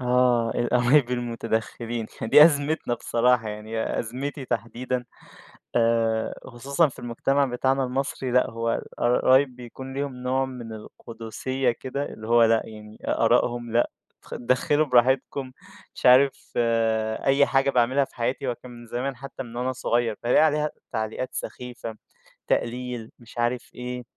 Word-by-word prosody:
آه. 125 -2 +2
القرايب 125 +2 +3
المتدخّلين 115 -1 -3 0.2
دي 150 +7 +8
أزمتنا 145 -4 +1
بصراحة. 120 -1 +1
يعني 110 +2 -3
أزمتي 135 +4 -4
تحديدًا 120 +2 -3 0.7
آآ 115 -1 +2
خصوصًا 140 +6 +1
في 135 - -11
المجتمع 135 +4 +1
بتاعنا 130 +2 0
المصري 130 0 -2
لأ، 125 +1 +3
هو 115 0 -2
الق - - -2 0.4
قرايب 130 0 +4
بيكون 130 +2 -9
ليهم 140 -1 -3
نوع 130 +1 0
من 120 -4 -8
القٌدسيّة 115 +4 -3
كده 130 +4 -4
اللي 110 0 -9
هو 120 0 +5
لأ، 115 0 +4
يعني 105 -1 -11
آراءهم 120 -1 +1
لأ 120 +1 +2 0.3
خد - - -8
اتدخّلوا 140 +5 +2
براحتكم، 130 +1 +2 0.4
مش - - -6
عارف 130 +2 +5 0.7
أي 140 +1 +5
حاجة 135 0 +2
باعملها 130 +2 +2
في - - -25
حياتي 130 +3 -2
هو 120 - -1
كان 125 +1 -13
من 120 0 -11
زمان 130 +4 -3
حتّى 135 +1 -8
من 120 -1 -11
وأنا 125 +2 -1
صغير 120 -3 0
فالاقي 125 +5 +4
عليها 150 0 +1 0.2
تعليقات 110 +3 -3
سخيفة، 120 -2 -6 0.5
تقليل 120 -1 -2
مش 120 -1 -16
عارف 120 +1 -1
إيه، 125 0 -5
125 Hz, 140 wpm, -25 LUFS, 115-130 Hz, 0.7 s, دي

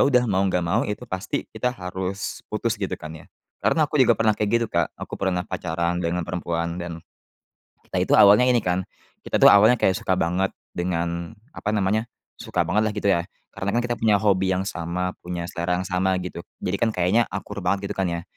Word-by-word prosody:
udah, 125 -3 +4
mau 100 -4 +1
nggak 90 -1 0
mau 85 - +1
itu 105 +4 -4
pasti 95 -5 -3
kita 125 - -1
harus 95 -3 -4
putus, 110 0 -2
gitu, 95 - -2
kan, 80 0 -8
ya. 80 0 -12 0.3
Karena 160 - +3
aku 150 -1 0
juga 120 -4 +5
pernah 110 -1 +3
kayak 105 0 -1
gitu, 115 -1 0
Kak. - - +2
Aku - - -7
pernah 90 -2 0
pacaran 85 0 -2
dengan 85 0 -1
perempuan 85 0 -3
dan 85 -1 -5 0.9
kita - - -2
itu - - +1
awalnya 105 +5 +7
ini, 125 -3 +3
kan, 90 +1 -1 0.4
kita - - 0
itu - - +10
awalnya 110 +4 +6
kayak 95 - +3
suka 95 - 0
banget 90 +2 0 0.2
dengan 85 +1 -2 0.2
apa 105 - -2
namanya, 105 +2 +1 0.3
suka - - -2
banget, 105 - +1
lah, 105 - -1
gitu, 105 -1 0
ya. 85 -3 +2 0.2
Karena, 95 - -4
kan, 120 - +2
kita 120 0 -2
punya 105 -3 +3
hobi 95 -2 +2
yang 90 - 0
sama, 90 0 -3 0.2
punya 90 -1 -4
selera 85 +1 -2
yang 95 - -5
sama, 95 0 +1
gitu. 90 -1 -7 0.2
Jadi, 95 +2 -1
kan, 110 0 +1
kayaknya 95 +6 +2
akur 100 -1 -5
banget, 100 +2 0
gitu, - - -4
kan, 95 - +1
ya. 85 -1 -2
95 Hz, 210 wpm, -24 LUFS, 90-105 Hz, 0.9 s, itu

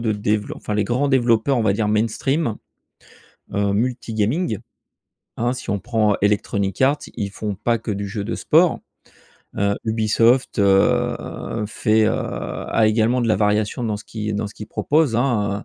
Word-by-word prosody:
de 115 -2 0
develo 105 0 -1
enfin 105 - -4
les 105 - +2
grands 125 +6 0
développeurs 125 0 +2
on 115 - +1
va 100 -2 +3
dire 105 +1 0
mainstream. 115 +5 0 1.0
Heu, 100 -1 +1
multi-gaming, 115 - -1 0.8
hein, 120 +2 0
si 130 - -6
on 100 - 0
prend 110 -1 +1
Electronic 100 -1 0
Arts, 140 +3 +3 0.2
ils 100 -1 -3
font 105 +1 -4
pas 115 +4 0
que 115 0 -6
du 100 0 -3
jeu 100 +1 -4
de 115 - -3
sport. 165 +2 +3 0.8
Heu, 100 0 +1
Ubisoft, 115 +2 +2
heu, 100 +2 +1
fait, 110 +1 +2
heu - - +3
a 110 -1 -1
également 115 +3 +2
de 120 - 0
la 110 - +3
variation 105 +3 0
dans 110 -3 -1
ce 105 - -11
qui 110 -1 -4
dans 105 +1 -2
ce 100 - -11
qu'il 105 - -9
propose, 145 -4 +1
hein, 105 -5 0
110 Hz, 170 wpm, -21 LUFS, 105-120 Hz, 1.0 s, va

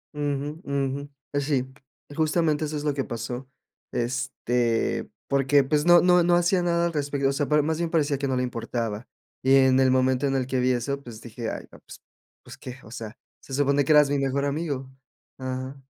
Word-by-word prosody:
Ujú, 145 +2 -3
ujú. 140 0 -2 0.2
Eh, 145 - +1
sí, 135 -3 0 0.5
justamente, 155 -1 +1
eso 150 0 -3
es 145 - -5
lo 150 -1 +1
que 135 -1 -1
pasó. 125 +3 -5 0.4
Este, 120 -2 -1 0.2
porque, 140 +1 +3
pues, 150 +2 +1
no 175 0 +7
no 180 0 +5
no 175 0 +4
hacía 175 +1 +3
nada 170 0 +1
al 170 - -1
respecto. 145 -2 0
O - - 0
sea, 145 0 -1
par 150 -1 +4
más 160 +1 -1
bien 170 -1 -1
parecía 145 -4 +1
que 140 - -1
no 130 - 0
le 125 - 0
importaba. 115 -2 -3 0.3
Y 135 +1 +4
en 130 -1 +5
el 130 -1 +4
momento 130 +1 +2
en 135 - 0
el 130 -1 0
que 130 0 -1
vi 125 +1 +2
eso, 140 +3 -2
pues, 115 -4 -10
dije: 115 0 -6
"Ay, - - -6
no, - - -15
pues - - -13 0.4
pues, - - -12
¿qué? 125 0 -9
O 110 - -14
sea, 115 -2 -7 0.2
se 135 - -12
supone 140 +1 +2
que 140 - 0
eras 150 -1 +6
mi 145 - +1
mejor 135 +1 0
amigo. 140 -2 -2 0.5
Ajá. 130 +1 -5
140 Hz, 210 wpm, -25 LUFS, 130-150 Hz, 0.5 s, no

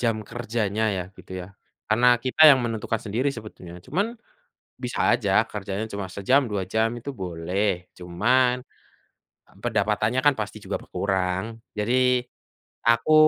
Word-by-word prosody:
jam 115 -2 +1
kerjanya 110 -2 -2
ya, 90 - -1 0.2
gitu - - -12
ya. - - -12 0.4
Karena 115 +3 +3 0.2
kita 130 +4 -3
yang 140 -3 +7
menentukan 115 -1 -2
sendiri 115 +6 0
sebetulnya, 95 -6 -10
cuman 200 - -1 0.7
bisa 125 - -3
aja 115 -5 +1 0.2
kerjanya 100 0 -3
cuma 100 -1 -4
sejam, 130 +8 +3
2 100 -2 -1
jam 110 0 +3
itu 140 +4 -6
boleh, 90 -2 -2
cuman, 120 +9 +2 0.9
eee, - - -23
pendapatannya 110 +4 +1
kan 145 - +6
pasti 105 - -4
juga - - -2
berkurang. 95 -1 -1 0.3
Jadi, 125 +3 +3 0.7
aku 115 +6 +3
110 Hz, 135 wpm, -25 LUFS, 95-125 Hz, 0.9 s, yang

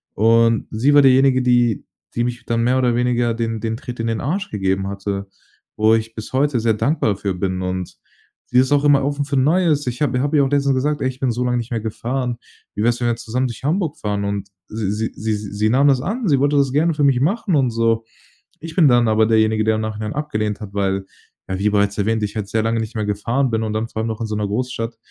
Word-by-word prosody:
Und, 115 +1 +3
sie 130 +7 +2
war 145 - +8
diejenige, 130 0 +5
die 120 -3 +2 0.3
die 120 - +1
mich 120 0 -4
dann 115 0 0
mehr 125 +2 +2
oder 125 -2 +2
weniger 120 -1 +1
den 115 -1 -2
den 115 0 -2
Tritt 120 0 -8
in 115 - -1
den 115 -1 -1
Arsch 190 +9 -2
gegeben 95 -1 -1
hatte, 100 0 -4 0.5
wo 110 +1 +4
ich 115 0 -3
bis 110 +2 -8
heute 135 -1 +2
sehr 115 0 +2
dankbar 110 -3 0
für 95 -1 -3
bin 95 0 -2
und 90 -1 -4 0.5
sie 125 - 0
ist 130 +2 +2
auch 145 0 +3
immer 140 -1 +4
offen 145 0 -1
für 140 -1 -1
Neues. 150 +1 +2
Ich 125 +2 -4
habe 130 -4 +1
habe 145 +2 +1
ihr 140 - +5
auch 135 - -1
letztens 140 -1 +2
gesagt: 145 +3 -1
„Ey, - - +1
ich 130 0 -9
bin 130 - 0
so 120 +2 -2
lange 125 0 +1
nicht 120 0 -4
mehr 115 -2 -1
gefahren. 120 +3 -3 0.4
Wie - - -2
wär's, 120 +1 +2
wenn 120 - +1
wir 120 - +1
zusammen 125 +3 -2
durch 120 +1 -9
Hamburg 160 +1 0
fahren“? 105 -1 -2
Und 100 0 -3 0.2
sie 105 -3 -2
sie 110 +2 -2
sie 110 0 -2
sie 105 +1 -2
nahm 135 +5 +4
das 135 -2 +3
an. 220 - -2
Sie 140 -5 +3
wollte 145 +2 +2
das 140 -2 +2
gerne 160 +2 +2
für 150 - 0
mich 135 -3 +4
machen 190 - +1
und 135 -4 +2
so. 115 0 +1 0.5
Ich 165 0 -9
bin 165 -6 +5
dann 120 -2 +4
aber 110 0 +3
derjenige, 110 -1 +2
der 110 0 +2
im 110 - -2
Nachhinein 110 0 -4
abgelehnt 110 -8 -3
hat, 100 -1 -8
weil 95 -1 -1 0.4
ja, 95 - -2
wie 105 +1 +2
bereits 100 -1 +1
erwähnt, 110 +1 0
ich 105 +1 -3
halt 100 -3 -4
sehr 110 0 0
lange 115 0 0
nicht 110 +2 -6
mehr 110 -1 -1
gefahren 115 +6 -1
bin 110 0 0
und 110 -1 -3
dann 110 +1 -2
vor 110 - -6
allem 110 - -2
noch 110 -1 -4
in - - -1
so 110 - -4
'ner 105 -1 -1
Großstadt, 115 +1 -3
115 Hz, 255 wpm, -20 LUFS, 110-135 Hz, 0.5 s, war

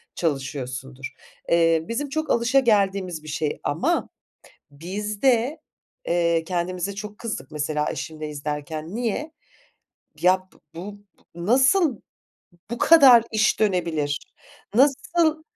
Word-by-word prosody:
çalışıyorsundur. 135 -3 -4 0.4
Eee, 165 -1 +3
bizim 275 +5 -3
çok 315 +3 -3
alışageldiğimiz 200 - +2
bir - - -12
şey 150 0 -2
ama 285 - 0 0.6
biz 200 +8 -5
de, 260 +3 +2 0.5
eee, 170 -1 +2
kendimize 180 +2 -3
çok 210 0 -7
kızdık 215 - -6
mesela 150 0 -1
eşimle 155 -1 -6
izlerken. 150 +4 -5
Niye? 245 +6 -2 0.9
Ya 185 +1 +5
b 185 - -24 0.3
bu 190 +5 -7 0.4
bu 170 0 -6
nasıl 265 - +3 0.7
bu 235 - -4
kadar 270 -8 +7
iş 215 0 +2
dönebilir? 170 -8 -1 0.4
Nasıl 310 +5 +2
185 Hz, 110 wpm, -24 LUFS, 155-235 Hz, 0.9 s, kadar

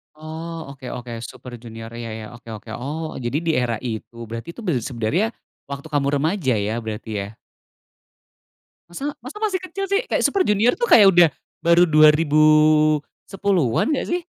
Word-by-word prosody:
Oh. 160 0 -7
Oke 130 -2 -8
oke. 120 -2 -7
Super 125 +1 -9
Junior 115 -1 -10
ya 115 -1 -6
ya, 110 0 -6
oke, 115 -1 -14
oke. 110 +1 -9
Oh, 155 +5 -5
jadi 120 +3 -2
di 165 - +1
era 120 -2 0
itu? 115 -1 -6
Berarti 115 +8 -6
itu - - -10
ber 175 -8 0
sebenernya 140 - -1 0.4
waktu 140 +2 -7
kamu 145 -2 0
remaja 155 - +1
ya, 105 +2 -1
berarti 110 0 -6
ya? 100 - -8 1.6
Masa? 280 +12 -4
Masa 255 - -9
masih 405 -4 0
kecil 375 +1 -4
sih? 400 +3 +2
Kayak - - 0
Super 395 - +2
Junior 210 +4 +3
tuh, 480 - 0
kayak 205 -3 +8
udah 175 -2 +7 0.3
baru 170 +1 +5
2010an 155 - +3
gak - - -2
sih? 355 +1 0
155 Hz, 165 wpm, -22 LUFS, 120-175 Hz, 1.6 s, kayak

